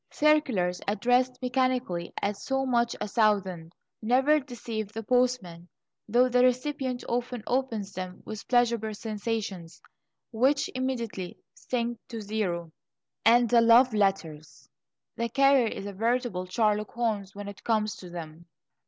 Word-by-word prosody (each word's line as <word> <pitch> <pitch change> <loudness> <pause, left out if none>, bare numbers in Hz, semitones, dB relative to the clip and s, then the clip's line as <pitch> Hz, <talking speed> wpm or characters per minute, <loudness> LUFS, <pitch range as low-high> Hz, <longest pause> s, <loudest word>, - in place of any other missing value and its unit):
Circulars 260 -13 +2
addressed 245 +4 +1
mechanically, 250 -8 0
at 200 +1 0
so 270 +6 -2
much 240 -2 +1
a - - -3
thousand, 195 -6 +1 0.3
never 265 +7 +3
deceive 230 -6 -6
the 225 +1 -6
postman, 245 -9 0 0.4
though 245 +4 +4
the 250 0 +3
recipient 255 0 0
often 245 -1 -2
opens 235 -6 -1
them 185 -1 -7
with 215 -2 -7
pleasurable 235 -3 +1
sensations, 210 -5 -4 0.5
which 265 +5 +2
immediately 235 -8 -3 0.2
sink 240 -2 -3
to 230 -3 -6
zero. 195 -6 -3 0.5
And 240 +1 +6
the 235 0 +5
love 235 +2 +6
letters! 170 -7 -1 0.5
The 235 0 -1
carrier 275 -1 +4
is 200 - -5
a 200 - -6
veritable 225 -3 -1
Sherlock 210 +1 0
Holmes 215 -5 -2
when 205 0 -7
it 200 -1 -10
comes 215 -2 0
to 180 - -10
them. 170 -1 -9
225 Hz, 135 wpm, -28 LUFS, 200-250 Hz, 0.5 s, And